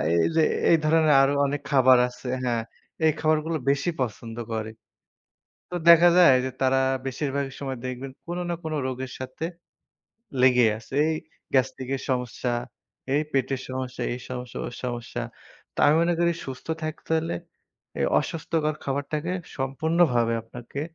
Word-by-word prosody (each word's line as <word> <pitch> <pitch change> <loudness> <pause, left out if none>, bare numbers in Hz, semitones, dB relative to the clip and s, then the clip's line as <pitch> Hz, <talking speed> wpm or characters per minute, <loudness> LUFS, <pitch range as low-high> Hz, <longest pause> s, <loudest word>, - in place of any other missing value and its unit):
এইযে 160 - +3 0.3
এই 165 - +7
ধরনের 155 -1 +4
আরো 135 +1 +3
অনেক 145 +1 -2
খাবার 130 -2 +6
আছে 125 - -11 0.2
হ্যা, 120 -2 +1 0.5
এই 155 - +6
খাবারগুলো 155 +1 +1
বেশি 140 +5 +1
পছন্দ 115 -1 -4 0.2
করে। 110 0 -3 1.0
তো 180 - -5
দেখা 170 +1 +9
যায় 170 -8 +8
যে - - -1
তারা 130 0 +3 0.3
বেশিরভাগ 140 +1 -2
সময় 135 -2 -4
দেখবেন 130 +1 -5
কোন 175 +1 -4
না 170 - 0
কোন 160 -1 -3
রোগের 130 0 -4
সাথে 130 +5 -5 1.0
লেগে 125 -2 +6
আছে। 115 +4 -12 0.2
এই - - 0 0.4
গ্যাস্ট্রিক 130 0 +1
এর - - -8
সমস্যা, 125 -1 -1 0.6
এই 150 - +4
পেটের 135 -1 0
সমস্যা, 130 -1 -4
এই 125 - -4
সমস্যা, 125 -1 -6
ওই 120 - -7
সমস্যা। 120 -1 -4 0.5
তো - - -15
আমি 150 - +5
মনে 170 0 +2
করি 170 0 +3
সুস্থ 130 -1 -8 0.2
থাকতে 155 +1 -6
হলে 160 - -3 0.6
এই - - +2
অস্বাস্থ্যকর 155 -1 -1
খাবারটাকে 145 +5 -2 0.2
সম্পূর্ণভাবে 135 -3 +2
আপনাকে 120 +4 -8
135 Hz, 145 wpm, -25 LUFS, 125-155 Hz, 1.0 s, দেখা